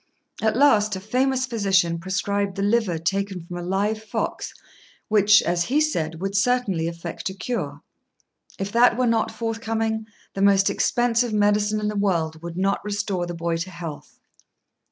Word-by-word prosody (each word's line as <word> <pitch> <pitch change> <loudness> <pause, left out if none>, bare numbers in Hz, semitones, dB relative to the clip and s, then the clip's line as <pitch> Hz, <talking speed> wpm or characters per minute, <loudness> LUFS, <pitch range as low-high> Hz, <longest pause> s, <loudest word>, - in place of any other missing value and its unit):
At 220 +1 +1
last 215 -7 +4
a - - -4
famous 255 +5 0
physician 190 -8 +1
prescribed 195 +2 -1
the 195 - -2
liver 205 -4 +1
taken 190 +1 -2
from 175 - -8
a - - -5
live 200 +4 -1
fox, 220 - -3 0.6
which, 210 -2 +5
as 170 0 0
he 280 +4 +2
said, 165 - -1
would 195 +2 -3
certainly 200 -6 +1
effect 170 +2 -5
a 190 - -8
cure. 185 - -4 0.7
If 195 +1 -4
that 235 +1 +4
were 255 - +2
not 230 -2 +1
forthcoming, 225 -1 -2 0.3
the 195 - -4
most 200 0 +4
expensive 240 +2 +1
medicine 210 0 +2
in 210 - -2
the 210 - -2
world 165 -6 0
would 170 0 -7
not 195 +1 0
restore 200 -3 -2
the 175 - -5
boy 170 0 -1
to 170 +3 -4
health. 170 -5 -9
200 Hz, 165 wpm, -23 LUFS, 175-220 Hz, 0.7 s, which